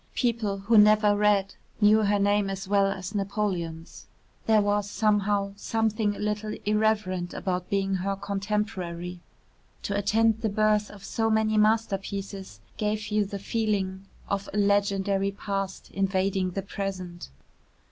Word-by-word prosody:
People 230 -5 0
who 210 +3 +4
never 210 0 +5
read 205 -1 +2 0.3
knew 215 0 +5
her 205 -1 +2
name 205 0 +2
as 195 0 -5
well 200 0 +3
as 190 0 -4
Napoleon's. 190 -5 -3 0.4
There 220 -1 +5
was, 205 0 +1
somehow, 205 -2 +1
something 215 0 0
a - - -10
little 210 0 -2
irreverent 210 -4 0
about 180 -2 -3
being 195 -1 0
her 195 +2 -2
contemporary. 195 -4 -3 0.6
To 200 - -2
attend 220 +2 +2
the 220 - 0
birth 210 0 +2
of 200 -2 -13
so 225 +2 -1
many 220 0 +2
masterpieces 200 - -1 0.2
gave 215 0 -2
you 210 -1 +1
the 200 +1 -5
feeling 195 -2 -2 0.2
of 200 0 -2
a 210 - -4
legendary 200 -1 +2
past 195 -1 -4
invading 190 -1 0
the 195 - -1
present. 185 -3 -5
200 Hz, 135 wpm, -27 LUFS, 195-210 Hz, 0.6 s, never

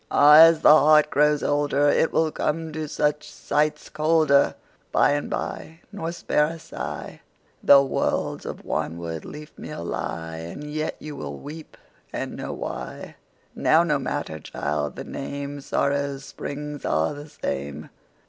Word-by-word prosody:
Áh! 150 +3 +9
ás 160 -1 -5
the - - +9
heart 150 0 +5
grows 150 0 +3
olderIt 145 +1 +2
will 160 -1 +2
come 160 +1 -2
to 155 0 -4
such 150 +1 -1
sights 150 +1 -1
colderBy 155 -2 +3 0.4
and 145 0 +3
by, 160 +1 -5
nor 170 -5 -4
spare 150 -3 +1
a 165 - -5 1.1
sighThough 140 -1 +7
worlds - - -1
of - - -7
wanwood 80 0 -3
leafmeal 150 - -8
lie; 80 -1 -4
And 85 - -7
yet 155 +1 -3
you 150 -1 -8
wíll 135 - -6
weep 155 +2 -10 0.3
and - - -4
know - - -5
why. 60 0 -6 0.4
Now - - +4
no - - +1
matter, 80 0 -4
child, 75 -1 -3
the - - -6
name:Sórrow's 140 0 -3
spríngs 145 0 -6
áre 80 - 0
the 150 - -14
same. 70 - -5
145 Hz, 135 wpm, -24 LUFS, 135-155 Hz, 1.1 s, Áh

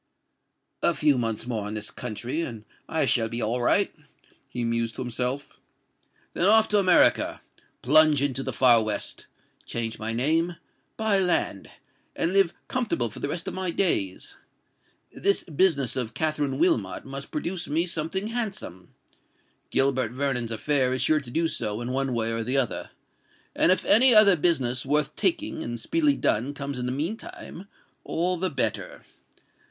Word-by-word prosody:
"A - - +2
few 150 -2 +3
months 115 -2 -3
more 110 -4 -3
in 105 - -5
this 105 -1 -5
country, 125 +9 -5
and 115 -9 -6 0.2
I 160 -2 0
shall 115 -3 +1
be 115 - -5
all 120 +2 -1
right," 120 - +2 0.6
he 120 - -4
mused 115 0 -1
to 130 - -4
himself: 125 +3 -4 0.7
"then 180 - +2
off 220 +1 +6
to 210 - +4
America—plunge 155 -5 +3
into 135 -2 -1
the - - -3
far 120 -3 +6
west—change 110 +1 -5
my 110 +1 -1
name—buy 165 - -1
land—and 175 - -3
live 195 -3 +4 0.2
comfortable 210 - -1
for - - -9
the 145 - -3
rest 170 +3 -4
of - - -3
my 185 -1 -3
days. 165 - -1 0.8
This 200 - 0
business 150 -6 +1
of 125 -3 -3
Katherine 145 -2 -1
Wilmot 115 - +1
must 135 +1 -7
produce 175 +4 -4
me 160 +4 0
something 175 +5 -2
handsome:—Gilbert 135 - -4
Vernon's 125 -3 -1
affair 130 +3 +2
is 130 - 0
sure 155 -1 +3
to 135 -5 -10
do 165 +6 0
so, 105 -8 -2
in 120 +1 -4
one 135 -1 -1
way 115 0 0
or 115 0 -2
the 125 +4 0
other;—and 135 - -3
if 185 - +1
any 245 +2 +5
other 205 -3 +7
business 135 -7 0
worth 150 +1 0
taking, 315 - -1
and 120 -3 -5
speedily 300 - +1
done, 130 +7 0
comes 140 -2 -5
in 125 - -3
the - - -2
meantime, 200 - -6 0.4
all 180 +3 -1
the 185 +2 -2
better. 140 - -3
140 Hz, 150 wpm, -25 LUFS, 120-175 Hz, 0.8 s, other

